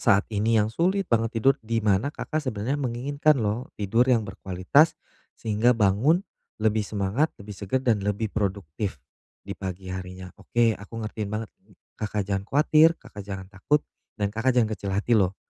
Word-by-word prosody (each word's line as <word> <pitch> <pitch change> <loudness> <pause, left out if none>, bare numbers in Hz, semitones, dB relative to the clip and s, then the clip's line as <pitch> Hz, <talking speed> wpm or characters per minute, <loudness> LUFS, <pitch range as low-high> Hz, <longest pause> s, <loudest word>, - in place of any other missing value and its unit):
saat 100 +1 +4
ini 110 +2 +2
yang 105 +1 +2
sulit 190 - +1
banget 115 -4 0
tidur 135 +4 +5
di 115 0 -2
mana 100 +5 +3
Kakak 155 +1 -3
sebenarnya 130 +1 -2
menginginkan 140 +5 +1
lho, 115 +2 -1
tidur 115 +5 +2
yang 115 -4 +3
berkualitas 95 - +2 0.4
sehingga 115 +2 +2
bangun 115 - +3 0.3
lebih 110 0 +1
semangat, 105 +8 0
lebih 100 +1 -9
segar 105 +7 -2
dan 115 -4 +3
lebih 105 +2 -2
produktif 100 -3 -2 0.5
di 100 - -5
pagi 95 -1 -6
harinya. 90 0 -7
Oke, 120 -1 +2
aku 110 +2 -7
ngertiin 105 -1 -4
banget. 110 0 -3 0.5
Kakak 105 -1 -1
jangan 100 0 -2
khawatir, 155 +3 +5
Kakak 115 -5 -11
jangan 95 -1 -5
takut, 145 +10 +1 0.3
dan 105 -1 -1
Kakak 125 +3 +1
jangan 110 -3 +3
kecil 100 -1 -5
hati 105 +5 0
loh. 95 -3 +3
110 Hz, 165 wpm, -26 LUFS, 100-125 Hz, 0.5 s, tidur